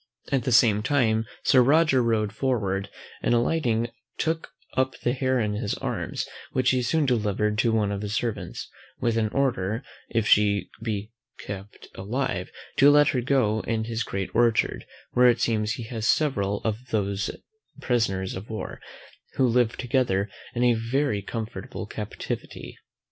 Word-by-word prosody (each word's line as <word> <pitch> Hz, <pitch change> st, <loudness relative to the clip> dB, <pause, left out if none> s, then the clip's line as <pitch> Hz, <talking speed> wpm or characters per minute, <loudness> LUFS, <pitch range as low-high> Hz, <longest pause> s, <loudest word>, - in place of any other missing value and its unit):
At 135 Hz, -4 st, +1 dB
the 130 Hz, -, 0 dB
same 110 Hz, -3 st, +5 dB
time 115 Hz, -4 st, +2 dB, 0.2 s
Sir 130 Hz, -, +6 dB
Roger 140 Hz, 0 st, +4 dB
rode 110 Hz, -3 st, +1 dB
forward, 100 Hz, -6 st, -1 dB, 0.3 s
and 120 Hz, -, +2 dB
alighting, 120 Hz, -3 st, +1 dB, 0.3 s
took 160 Hz, 0 st, -1 dB, 0.3 s
up 130 Hz, 0 st, 0 dB
the 120 Hz, -, +1 dB
hare 130 Hz, -1 st, +1 dB
in 105 Hz, -2 st, 0 dB
his 105 Hz, -1 st, -2 dB
arms; -, -, -3 dB, 0.3 s
which 130 Hz, 0 st, +3 dB
he 130 Hz, -1 st, +2 dB
soon 150 Hz, +5 st, +1 dB
delivered 105 Hz, -4 st, +1 dB
up 105 Hz, -, -3 dB
to 115 Hz, -1 st, +3 dB
one 105 Hz, -2 st, +1 dB
of 100 Hz, -1 st, -3 dB
his 105 Hz, 0 st, -3 dB
servants, 115 Hz, -2 st, -3 dB, 0.3 s
with 120 Hz, -2 st, +1 dB
an 110 Hz, -1 st, +1 dB
order, 115 Hz, -3 st, 0 dB, 0.3 s
if 115 Hz, -2 st, 0 dB
she 100 Hz, -2 st, +3 dB
could -, -, -15 dB
be 105 Hz, -1 st, -3 dB, 0.3 s
kept 100 Hz, 0 st, -8 dB
alive, 105 Hz, -2 st, -2 dB, 0.3 s
to 140 Hz, -, +7 dB
let 145 Hz, 0 st, +6 dB
her 125 Hz, -, 0 dB
go 120 Hz, -4 st, +2 dB
in 110 Hz, 0 st, -1 dB
his 115 Hz, 0 st, -3 dB
great 95 Hz, -1 st, -4 dB
orchard; 115 Hz, -1 st, +2 dB, 0.2 s
where 125 Hz, 0 st, +5 dB
it 120 Hz, -, +2 dB
seems 110 Hz, -2 st, +1 dB
he 120 Hz, -, -5 dB
has 110 Hz, -1 st, -3 dB
several 100 Hz, -10 st, +1 dB
of 110 Hz, -1 st, -1 dB
these 100 Hz, -2 st, 0 dB, 0.5 s
prisoners 95 Hz, -6 st, 0 dB
of 95 Hz, +4 st, -8 dB
war, 110 Hz, -1 st, -6 dB, 0.5 s
who 130 Hz, -, +3 dB
live 120 Hz, -1 st, +2 dB
together 120 Hz, -6 st, 0 dB, 0.2 s
in 120 Hz, -, +1 dB
a 120 Hz, -1 st, +5 dB
very 115 Hz, 0 st, 0 dB
comfortable 110 Hz, +2 st, -5 dB
captivity. -, -, -6 dB
115 Hz, 165 wpm, -26 LUFS, 105-125 Hz, 0.5 s, to